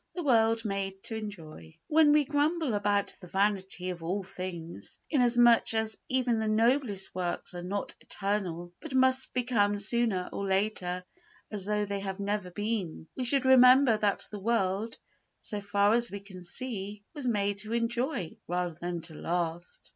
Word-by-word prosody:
The 350 - -3
World 225 -4 +2
Made 195 -1 -3
to 225 - -1
Enjoy 165 - -9
When 310 -1 +4
we 295 -1 +4
grumble 300 -1 0
about 205 -1 0
the 180 - -11
vanity 190 -1 0
of 175 -2 -8
all 185 +5 -2
human 185 - -7
things, 170 - -7
inasmuch 240 -4 +4
as 220 -1 +1
even 250 -3 +1
the 220 - -1
noblest 220 -2 +1
works 180 0 -2
are 175 - -6
not 195 +3 -4
eternal 180 -4 -3
but 300 -4 -7
must 260 0 +4
become 230 -5 +1
sooner 205 -2 +2
or 200 - -3
later 190 -2 0 0.5
as 205 -3 -1
though 210 0 0
they 200 0 -3
had 195 -1 -5
never 200 -2 -2
been, 205 -5 -4
we 255 - -2
should 270 +2 +5
remember 255 -1 +7
that 210 -2 0
the 210 - -6
world, 215 0 -1 0.4
so 210 -1 -2
far 205 +1 +2
as 235 0 +5
we 200 - -6
can 190 -2 -11
see, 205 0 -3
was 290 -5 -3
made 205 -3 0
to 215 +2 -4
enjoy 235 - -1
rather 175 0 -2
than 175 +1 -5
to 165 0 -3
last. 170 +1 -4
205 Hz, 170 wpm, -29 LUFS, 185-235 Hz, 0.5 s, remember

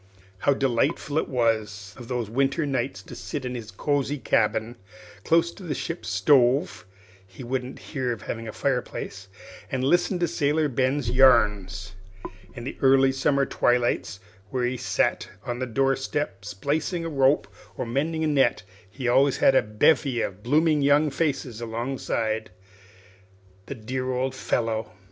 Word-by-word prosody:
How 140 +7 +2
delightful 135 +4 0
it - - -3
was 110 -6 -1
of 120 -2 -11 0.2
winter 135 +7 0
nights 120 -8 -2
to - - -11
sit 145 -4 -5
in 125 - -3
his 115 -3 -6
cosey 145 +6 -1
cabin, 115 -1 0 0.5
close 165 +1 +3
to 195 - -14
the 165 -6 -3
ship's 170 +6 -5
stove 135 - +3 0.4
(he 95 +7 -11
wouldn't 125 +1 -3 0.2
hear 130 -4 -1
of 115 -3 -5
having 115 0 -5
a - - -4
fireplace), 120 -6 -3 0.4
and 130 -1 -1
listen 175 +6 +2
to 175 -1 +1
Sailor 150 +1 +1
Ben's 130 0 0
yarns! 105 -7 +3 0.6
In 120 - -7
the 130 - -6
early 135 0 +5
summer 140 +1 +1
twilights, 120 -7 0 0.3
when 125 +1 0
he 130 - -3
sat 125 - 0 0.2
on 120 -1 -3
the 130 - -2
door 135 +3 +2
step 135 -7 -4
splicing 145 - -2
a - - -2
rope 140 -2 +2 0.3
or - - -2
mending 155 +7 -1
a - - +2
net, 135 -9 +2 0.3
he 125 +5 -5
always 135 +3 +4
had - - +5
a - - +5
bevy 120 +4 +2
of 100 +1 -5
blooming 150 +5 +2
young 145 +2 +4
faces 135 -6 -2
alongside. 115 -2 -2 1.2
The 140 - -5
dear 130 +3 -4
old 130 +1 -1
fellow! 115 -4 -2
130 Hz, 155 wpm, -25 LUFS, 115-145 Hz, 1.2 s, early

